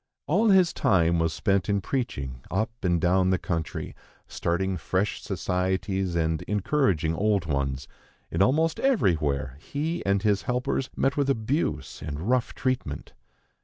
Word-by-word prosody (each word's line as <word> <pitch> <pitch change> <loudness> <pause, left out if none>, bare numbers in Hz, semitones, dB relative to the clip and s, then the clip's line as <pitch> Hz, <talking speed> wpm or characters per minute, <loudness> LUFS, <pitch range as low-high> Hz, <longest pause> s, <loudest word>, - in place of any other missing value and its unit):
All 205 +9 +3
his 185 -3 +5
time 85 -3 +3
was 80 -1 +1
spent 95 +3 0
in 100 0 +2
preaching 70 - -3
up 110 +3 0
and 85 -2 +2
down 90 +2 +3
the 95 - +3
country, 80 -4 -3 0.3
starting 95 +3 -1
fresh 95 +4 -1
societies, 95 0 -1
and 80 -2 0
encouraging 100 - +1
old 100 0 +1
ones; 70 -2 -2 0.4
and - - 0
almost 160 +9 +3
everywhere 75 - +1
he 155 - -3
and 100 0 +1
his 105 -3 +2
helpers 125 +1 -1
met 135 +1 +1
with 140 -1 +1
abuse 110 - -1
and 75 -1 -5
rough 125 -1 +1
treatment. 130 -1 -3
95 Hz, 140 wpm, -26 LUFS, 80-130 Hz, 0.4 s, his